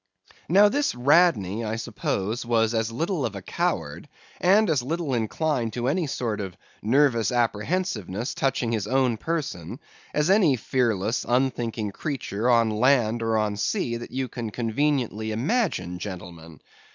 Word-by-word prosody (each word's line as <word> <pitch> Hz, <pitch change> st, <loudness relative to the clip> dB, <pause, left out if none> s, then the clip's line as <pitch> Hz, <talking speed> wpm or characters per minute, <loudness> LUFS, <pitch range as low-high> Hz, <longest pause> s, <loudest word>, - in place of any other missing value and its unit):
Now 200 Hz, +5 st, +7 dB
this 285 Hz, -, 0 dB
Radney, 125 Hz, -, +3 dB
I 110 Hz, 0 st, -2 dB
suppose, 110 Hz, 0 st, -2 dB
was 115 Hz, -1 st, +1 dB
as 115 Hz, 0 st, 0 dB
little 165 Hz, -, -1 dB
of 110 Hz, -4 st, -2 dB
a 100 Hz, -, -6 dB
coward, -, -, -2 dB, 0.3 s
and 200 Hz, +4 st, +4 dB
as 155 Hz, -6 st, +2 dB
little 155 Hz, +2 st, -2 dB
inclined 120 Hz, +1 st, -1 dB
to 120 Hz, 0 st, -2 dB
any 160 Hz, +3 st, 0 dB
sort 115 Hz, -6 st, -2 dB
of 95 Hz, -2 st, -7 dB, 0.2 s
nervous 115 Hz, -2 st, +3 dB
apprehensiveness 120 Hz, -, -1 dB
touching 130 Hz, -3 st, 0 dB
his 105 Hz, -3 st, -1 dB
own 130 Hz, -2 st, +2 dB
person 125 Hz, -, -4 dB, 0.3 s
as 150 Hz, +4 st, +1 dB
any 190 Hz, -9 st, +5 dB
fearless, 115 Hz, -3 st, 0 dB
unthinking 120 Hz, -4 st, 0 dB
creature 125 Hz, -4 st, -3 dB
on 115 Hz, -2 st, +4 dB
land 120 Hz, 0 st, +2 dB
or 115 Hz, -1 st, +1 dB
on 105 Hz, -1 st, 0 dB
sea 120 Hz, -, -1 dB
that 120 Hz, -, -8 dB
you 130 Hz, 0 st, -2 dB
can 120 Hz, -2 st, -5 dB
conveniently 115 Hz, -1 st, -1 dB
imagine, 125 Hz, -, -1 dB
gentlemen. 85 Hz, -5 st, -8 dB
120 Hz, 145 wpm, -25 LUFS, 110-145 Hz, 0.3 s, Now